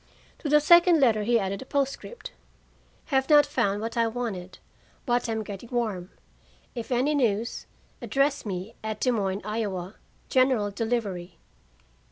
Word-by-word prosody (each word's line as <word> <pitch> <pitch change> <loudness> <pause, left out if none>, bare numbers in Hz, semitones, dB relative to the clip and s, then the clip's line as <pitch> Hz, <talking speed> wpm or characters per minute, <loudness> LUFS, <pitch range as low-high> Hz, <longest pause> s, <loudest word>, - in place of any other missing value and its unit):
To 300 - -4
the 300 +1 +6
second 345 +2 +6
letter 230 -6 +4
he 235 +3 +2
added 195 -1 -3
a - - -8
postscript: 280 - -3 0.8
"Have 265 +1 +2
not 295 -1 +7
found 205 -8 0
what 225 +2 -4
I 230 -1 +2
wanted, 220 -6 -5 0.5
but 245 -2 0
am 220 -1 -1
getting 205 +3 -8
warm. 215 -7 -2 0.6
If 235 0 -6
any 255 +5 +2
news, 230 -5 0 0.3
address 275 +1 +1
me 195 +1 -5
at 215 -1 -4
Des 255 - +2
Moines, 200 -3 -1
Iowa, 205 -3 -3 0.3
General 255 -6 +2
Delivery. 200 -6 -3
230 Hz, 145 wpm, -26 LUFS, 200-265 Hz, 0.8 s, not